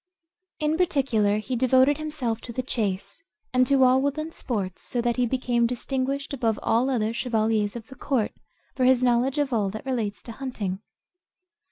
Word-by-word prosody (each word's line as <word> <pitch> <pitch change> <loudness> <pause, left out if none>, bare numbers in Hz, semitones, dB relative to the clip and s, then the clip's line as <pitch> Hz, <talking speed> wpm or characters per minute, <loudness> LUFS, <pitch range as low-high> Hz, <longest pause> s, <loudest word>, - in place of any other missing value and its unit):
In 305 0 +1
particular, 250 - +2
he 230 +4 -3
devoted 260 +4 +4
himself 280 -8 -3
to 235 - -7
the 255 +2 -3
chase 200 - -2 0.3
and 255 0 +4
to 275 -1 +4
all 255 +1 +5
woodland 310 +3 -2
sports, 195 -7 -3
so 245 - -3
that 240 0 0
he 250 -1 +2
became 240 -1 +1
distinguished 270 +3 -2
above 230 -5 0
all 240 +4 +2
other 225 -4 0
chevaliers 220 -3 0
of 230 -2 -7
the 265 - -12
court 250 -5 0 0.4
for 255 - -1
his 255 0 +4
knowledge 250 +3 +2
of 285 -3 0
all 210 -4 +1
that 215 +5 -7
relates 230 -6 -2
to 235 - -8
hunting. 220 -7 -4
250 Hz, 175 wpm, -25 LUFS, 225-265 Hz, 0.4 s, all